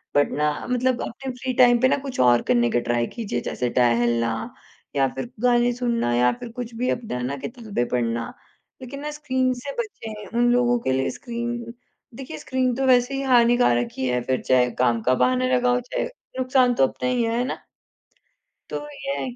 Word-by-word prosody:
But 145 0 +3
ना 150 0 +2 0.2
मतलब 250 0 +1
अपने 265 +3 -6
फ्री 255 +1 -4
टाइम 245 -1 +5
पे 260 - +6
ना - - +2
कुछ 275 -2 -6
और 120 -1 +5
करने 120 -1 +3
का 120 - +2
ट्राई 120 0 0
कीजिए, 205 - -3
जैसे 125 0 -2
टहलना 120 -1 +1 0.4
या 135 -1 +3
फ़िर 240 - -5
गाने 240 0 +4
सुनना 235 - 0
या 125 +1 +4
फ़िर 235 - -8
कुछ 240 0 -6
भी 250 +2 -1
अपना 230 - -2
है 125 - -4
ना 130 +3 -2
किताबें 215 - -4
पढ़ना 115 -1 -1 0.5
लेक़िन 260 +2 -7
ना 300 +1 -4
स्क्रीन 260 -4 0
से 250 +3 -6
बचें, 220 - -6
उन 240 0 +4
लोगों 245 0 +3
के 130 - -1
लिए 130 0 +1
स्क्रीन 235 -1 -5 0.4
देखिए 255 -11 -7
स्क्रीन 255 +6 -1
तो 270 +2 0
वैसे 250 0 +4
ही 270 - -2
हानिकारक 240 - +4
ही 130 - -1
है, 125 0 0
फ़िर 130 +1 -1
चाहे 125 -1 +3
काम 120 -2 +2
का 125 +4 +2
बहाना 255 - +2
लगाओ 245 0 +2
चाहे 245 - -3 0.3
नुकसान 255 -1 +3
तो 135 - +4
अपना 250 - -3
ही, 250 -1 +1
है 230 +2 0
ना? 255 - -5 1.0
तो - - -3
ये 275 -1 -4
है 260 - -3
कि - - -13
240 Hz, 200 wpm, -23 LUFS, -, 1.0 s, पे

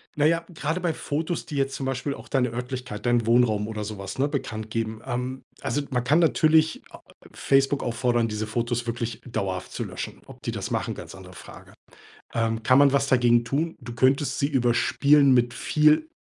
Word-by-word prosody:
Na 150 - +2
ja, 165 +1 +2
grade 160 +2 -2
bei 170 -2 0
Fotos, 160 +3 -3
die 150 - -7
jetzt 135 -1 0
zum 135 - -4
Beispiel 135 +2 -2
auch - - -12
deine 130 -3 +1
Örtlichkeit, 125 -3 -6
deinen 120 -2 +2
Wohnraum 115 -3 +3
oder 110 -1 -4
so 105 0 -6
was, 100 +4 -7
ne, 140 - +3
bekanntgeben. 110 -5 -4
Ähm, 125 +2 -4 0.2
also 145 - -1
man 125 -2 -1
kann 145 +6 +3
natürlich 160 -1 +3
a - - -11
a - - -21
a - - -31 0.3
Facebook 135 0 +2
auffordern, 120 -1 +1
diese 105 0 -3
Fotos 120 +1 -2
wirklich 115 -1 -4
dauerhaft 95 -6 -3
zu - - -4
löschen, - - -7
ob - - -14
die - - -2
das - - -5
machen, - - -1
ganz - - -9
andere 95 -1 -12
Frage. - - -13 0.6
Ähm, 115 -1 0
kann 130 +2 +5
man 140 -1 +5
was 140 0 +2
dagegen 120 -2 +4
tun? 155 +7 -1
Du 120 -1 -8
könntest 130 +4 +2
sie 140 - +2
überspielen 140 +2 +3
mit 120 -1 +2
viel 150 - +3
125 Hz, 200 wpm, -25 LUFS, 115-140 Hz, 0.6 s, kann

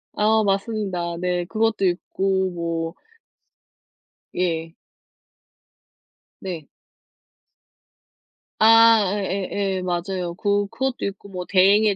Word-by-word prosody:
아 220 +1 +3
맞습니다. 195 -4 -1
네 180 -1 -1
그것도 220 +1 0
있고 190 +1 0
뭐 165 -1 -3 1.4
예. 165 -2 -2 1.7
네. 170 -6 -6 1.9
아 225 -3 +6
예 195 -2 -2
예예 195 -2 -1
맞아요. 180 0 -3
그 205 +2 0
그것도 265 +2 -2
있고 200 0 -6
뭐 180 -2 -6
대행의 200 +2 +4
190 Hz, 155 characters per minute, -22 LUFS, 175-210 Hz, 1.9 s, 아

